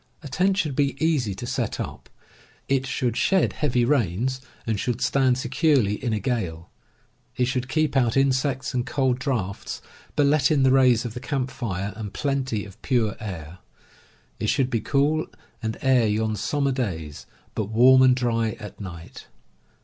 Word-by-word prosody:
A -, -, -6 dB
tent 190 Hz, +8 st, +1 dB
should 155 Hz, -9 st, 0 dB
be 140 Hz, -1 st, +1 dB
easy 145 Hz, -, +1 dB
to -, -, -6 dB
set -, -, -2 dB
up. -, -, -6 dB, 0.6 s
It 135 Hz, -1 st, +1 dB
should 125 Hz, -3 st, -1 dB
shed 190 Hz, +5 st, +2 dB
heavy 125 Hz, -5 st, +1 dB
rains, 125 Hz, -, 0 dB, 0.2 s
and 110 Hz, -3 st, -1 dB
should 120 Hz, +1 st, -1 dB
stand 130 Hz, 0 st, +2 dB
securely 130 Hz, -, +1 dB
in 120 Hz, -, 0 dB
a 110 Hz, -, 0 dB
gale. 95 Hz, -10 st, -3 dB, 0.7 s
It 125 Hz, -, +3 dB
should 130 Hz, 0 st, -2 dB
keep 155 Hz, +1 st, +1 dB
out 125 Hz, -2 st, +2 dB
insects 135 Hz, -1 st, +1 dB
and 125 Hz, -1 st, 0 dB
cold 130 Hz, 0 st, 0 dB
draughts, 115 Hz, -8 st, -3 dB, 0.4 s
but 145 Hz, -, +3 dB
let 145 Hz, -1 st, +3 dB
in 145 Hz, -3 st, +3 dB
the 130 Hz, -, +5 dB
rays 125 Hz, -3 st, +4 dB
of 115 Hz, -, -4 dB
the 125 Hz, -, -6 dB
camp 130 Hz, -1 st, -2 dB
fire 100 Hz, -6 st, -4 dB
and 105 Hz, -2 st, -6 dB
plenty 135 Hz, -7 st, -1 dB
of 100 Hz, -2 st, -14 dB
pure 115 Hz, -6 st, +1 dB
air. 90 Hz, -6 st, -7 dB, 0.8 s
It 105 Hz, -, -1 dB
should 130 Hz, -1 st, +1 dB
be 115 Hz, -, 0 dB
cool 150 Hz, +5 st, +1 dB, 0.3 s
and 110 Hz, 0 st, -3 dB
air 130 Hz, -4 st, +4 dB
yon 110 Hz, +1 st, 0 dB
summer 140 Hz, +5 st, 0 dB
days, 85 Hz, -, -4 dB, 0.3 s
but 110 Hz, -, -2 dB
warm 125 Hz, +5 st, +6 dB
and 130 Hz, -1 st, +6 dB
dry 115 Hz, -3 st, 0 dB
at 105 Hz, 0 st, -9 dB
night. 85 Hz, -4 st, -9 dB
125 Hz, 170 wpm, -24 LUFS, 110-135 Hz, 0.8 s, warm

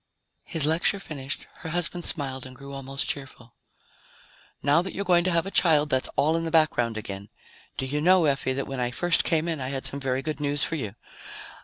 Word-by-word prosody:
His 160 Hz, -5 st, -1 dB
lecture 160 Hz, +6 st, +2 dB
finished, 145 Hz, -7 st, -5 dB
her 160 Hz, -, -7 dB
husband 175 Hz, +1 st, +1 dB
smiled 135 Hz, -3 st, -1 dB
and 130 Hz, -, -12 dB
grew 140 Hz, +2 st, -10 dB
almost 135 Hz, 0 st, -4 dB
cheerful. 130 Hz, -4 st, -4 dB, 1.1 s
"Now 145 Hz, +4 st, +4 dB
that 185 Hz, -, -6 dB
you're 200 Hz, -, -2 dB
going 175 Hz, -2 st, +4 dB
to 185 Hz, -, +2 dB
have 170 Hz, 0 st, +2 dB
a 195 Hz, -, -5 dB
child, 150 Hz, -5 st, +4 dB
that's 130 Hz, 0 st, +1 dB
all 155 Hz, +3 st, +3 dB
in 165 Hz, -, 0 dB
the 165 Hz, -, -2 dB
background 155 Hz, -8 st, +2 dB
again. 100 Hz, -1 st, -6 dB, 0.5 s
Do 130 Hz, -, -1 dB
you 145 Hz, +3 st, -1 dB
know, 180 Hz, +1 st, +5 dB
Effie, 135 Hz, -2 st, +1 dB
that 135 Hz, +1 st, -2 dB
when 135 Hz, -1 st, -5 dB
I 120 Hz, -1 st, 0 dB
first 175 Hz, +7 st, +2 dB
came 165 Hz, 0 st, +1 dB
in, 160 Hz, -4 st, -2 dB
I 130 Hz, -, -2 dB
had 135 Hz, -1 st, -4 dB
some 135 Hz, +1 st, 0 dB
very 135 Hz, -1 st, -1 dB
good 155 Hz, -1 st, -3 dB
news 145 Hz, 0 st, 0 dB
for -, -, 0 dB
you? 110 Hz, -10 st, -3 dB
145 Hz, 215 wpm, -26 LUFS, 130-165 Hz, 1.1 s, know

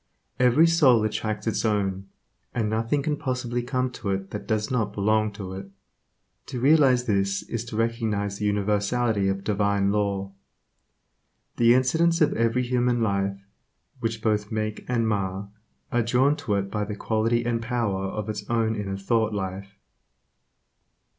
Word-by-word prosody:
Every 125 Hz, +6 st, +5 dB
soul 145 Hz, -9 st, +5 dB
attracts 110 Hz, -1 st, -2 dB
its 110 Hz, -, 0 dB
own, 100 Hz, -3 st, -1 dB, 0.5 s
and 115 Hz, -3 st, 0 dB
nothing 115 Hz, +6 st, 0 dB
can 150 Hz, 0 st, -1 dB
possibly 125 Hz, -2 st, -2 dB
come 125 Hz, +1 st, -1 dB
to 115 Hz, -4 st, -5 dB
it 95 Hz, 0 st, -2 dB
that 105 Hz, -, -6 dB
does 110 Hz, 0 st, -1 dB
not 110 Hz, -5 st, 0 dB
belong 110 Hz, +1 st, +1 dB
to 100 Hz, -3 st, -7 dB
it. 95 Hz, +1 st, -8 dB, 0.8 s
To 125 Hz, -, -4 dB
realize 135 Hz, -2 st, +4 dB
this 100 Hz, -3 st, 0 dB
is 115 Hz, -1 st, -4 dB
to 115 Hz, -, -7 dB
recognize 110 Hz, -3 st, -1 dB
the 105 Hz, -, -2 dB
universality 105 Hz, +1 st, +1 dB
of 95 Hz, 0 st, -1 dB
Divine 100 Hz, -1 st, +1 dB
Law. 100 Hz, -2 st, -1 dB, 1.2 s
The 120 Hz, +1 st, +5 dB
incidents 165 Hz, +6 st, +2 dB
of 155 Hz, -2 st, +3 dB
every 115 Hz, +2 st, +1 dB
human 120 Hz, -1 st, +1 dB
life, 100 Hz, -1 st, -1 dB, 0.5 s
which 115 Hz, -2 st, -3 dB
both 105 Hz, -2 st, 0 dB
make 110 Hz, -1 st, -3 dB
and 115 Hz, -2 st, +1 dB
mar, 100 Hz, -1 st, -2 dB, 0.4 s
are 120 Hz, -, +2 dB
drawn 125 Hz, +5 st, +3 dB
to 105 Hz, -, -1 dB
it 100 Hz, 0 st, -2 dB
by 105 Hz, -1 st, -1 dB
the 105 Hz, 0 st, -4 dB
quality 115 Hz, +2 st, 0 dB
and 115 Hz, -1 st, 0 dB
power 115 Hz, -5 st, -1 dB
of 105 Hz, +2 st, -4 dB
its 105 Hz, -1 st, -5 dB
own 115 Hz, -1 st, +1 dB
inner 95 Hz, -2 st, -3 dB
thought 110 Hz, +2 st, 0 dB
life. 100 Hz, 0 st, -5 dB
110 Hz, 155 wpm, -25 LUFS, 100-120 Hz, 1.2 s, Every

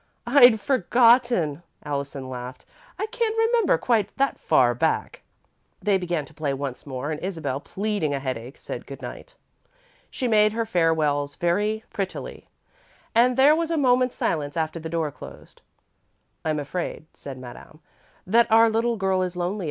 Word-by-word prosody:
"I'd 245 Hz, -3 st, +6 dB
forgotten," 235 Hz, -, +3 dB, 0.2 s
Allison 140 Hz, -2 st, -4 dB
laughed. 125 Hz, 0 st, -8 dB, 0.3 s
"I -, -, -1 dB
can't 450 Hz, -1 st, -2 dB
remember 450 Hz, -3 st, +3 dB
quite 220 Hz, -5 st, +1 dB
that 275 Hz, 0 st, 0 dB
far -, -, +3 dB
back." -, -, -1 dB, 0.6 s
They 200 Hz, -2 st, +1 dB
began 175 Hz, -4 st, -2 dB
to 160 Hz, -, -17 dB
play 145 Hz, -2 st, -2 dB
once 135 Hz, 0 st, -6 dB
more 135 Hz, +2 st, -4 dB
and 155 Hz, -, -4 dB
Isabel, 160 Hz, -8 st, -3 dB
pleading 200 Hz, -2 st, -2 dB
a 140 Hz, -, -1 dB
headache, 130 Hz, -1 st, -5 dB
said -, -, -7 dB
good -, -, -9 dB
night. -, -, -9 dB, 0.7 s
She 255 Hz, -, -3 dB
made 215 Hz, -2 st, +4 dB
her 230 Hz, 0 st, -1 dB
farewells 155 Hz, -7 st, +1 dB
very 210 Hz, +5 st, 0 dB
prettily 195 Hz, -2 st, -5 dB, 0.7 s
and 245 Hz, +2 st, +4 dB
there 285 Hz, +3 st, +6 dB
was 330 Hz, 0 st, -1 dB
a 330 Hz, -, 0 dB
moment's 255 Hz, -2 st, +2 dB
silence 145 Hz, -1 st, -2 dB
after 160 Hz, +1 st, -2 dB
the 160 Hz, 0 st, -6 dB
door 160 Hz, -2 st, -1 dB
closed. -, -, -13 dB, 0.8 s
"I'm 155 Hz, -1 st, -1 dB
afraid," 155 Hz, +2 st, -4 dB
said 135 Hz, -2 st, -9 dB
Madame, 130 Hz, +4 st, -12 dB, 0.5 s
"that 230 Hz, +4 st, +3 dB
our 225 Hz, 0 st, +6 dB
little 230 Hz, +1 st, 0 dB
girl 190 Hz, -1 st, +1 dB
is 180 Hz, -1 st, -2 dB
lonely. 180 Hz, +4 st, -2 dB
185 Hz, 155 wpm, -24 LUFS, 145-235 Hz, 0.8 s, I'd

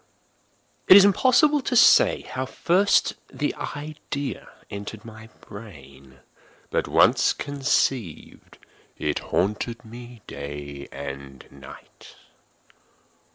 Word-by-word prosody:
It 185 Hz, -, +10 dB
is 200 Hz, -, +8 dB
impossible 265 Hz, -, +3 dB
to 255 Hz, -, -3 dB
say -, -, +5 dB
how 130 Hz, +1 st, -5 dB
first 190 Hz, +8 st, +2 dB, 0.2 s
the 145 Hz, -, -2 dB
idea 145 Hz, -1 st, -6 dB, 0.2 s
entered 100 Hz, +2 st, -8 dB
my 110 Hz, 0 st, -12 dB
brain; 70 Hz, -, -14 dB, 0.5 s
but -, -, -1 dB
once -, -, +3 dB
conceived, 135 Hz, -, -2 dB, 0.4 s
it 75 Hz, -, -2 dB
haunted 115 Hz, +5 st, -2 dB
me 120 Hz, 0 st, -12 dB
day 70 Hz, 0 st, -8 dB
and 70 Hz, -1 st, -9 dB
night. 70 Hz, -1 st, -15 dB
110 Hz, 95 wpm, -24 LUFS, -, 0.5 s, It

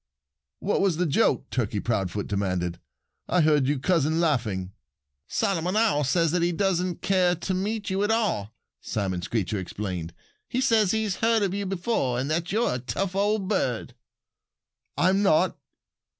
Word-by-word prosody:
"What 205 Hz, -, +1 dB
was 190 Hz, -5 st, +2 dB
the 180 Hz, -, +1 dB
joke?" 150 Hz, -, +2 dB
Turkey 110 Hz, -4 st, -1 dB
Proudfoot 105 Hz, -3 st, -1 dB
demanded. 90 Hz, -4 st, -2 dB, 0.5 s
"I 180 Hz, -, +3 dB
heard 150 Hz, -4 st, +3 dB
you 145 Hz, +1 st, +1 dB
cousin 160 Hz, +2 st, +1 dB
laughing." 110 Hz, -, 0 dB, 0.6 s
"Solomon 185 Hz, -4 st, 0 dB
Owl 215 Hz, -10 st, +3 dB
says 165 Hz, +3 st, +2 dB
that 180 Hz, 0 st, +1 dB
he 170 Hz, +1 st, +2 dB
doesn't 180 Hz, -1 st, -1 dB
care 185 Hz, -2 st, +3 dB
to 175 Hz, +3 st, -3 dB
meet 205 Hz, +2 st, -2 dB
you 190 Hz, +1 st, 0 dB
at 205 Hz, -, +1 dB
all," 210 Hz, -, 0 dB, 0.3 s
Simon 95 Hz, -5 st, -2 dB
Screecher 105 Hz, +1 st, -2 dB
explained. 90 Hz, -3 st, -5 dB, 0.3 s
"He 250 Hz, -, -1 dB
says 225 Hz, -6 st, +3 dB
he 220 Hz, +2 st, +1 dB
has 205 Hz, -3 st, -2 dB
heard 225 Hz, -1 st, +2 dB
about 195 Hz, -1 st, 0 dB
you 200 Hz, -1 st, -2 dB
before 185 Hz, -, -1 dB
and 135 Hz, +4 st, -2 dB
that 170 Hz, +2 st, -1 dB
you're 225 Hz, -, +1 dB
a 125 Hz, -, -2 dB
tough 140 Hz, -, -3 dB
old 205 Hz, 0 st, +1 dB
bird." 130 Hz, -, -1 dB, 1.0 s
"I'm 190 Hz, +3 st, +3 dB
not!" 185 Hz, -2 st, +3 dB
170 Hz, 165 wpm, -26 LUFS, 120-195 Hz, 1.0 s, I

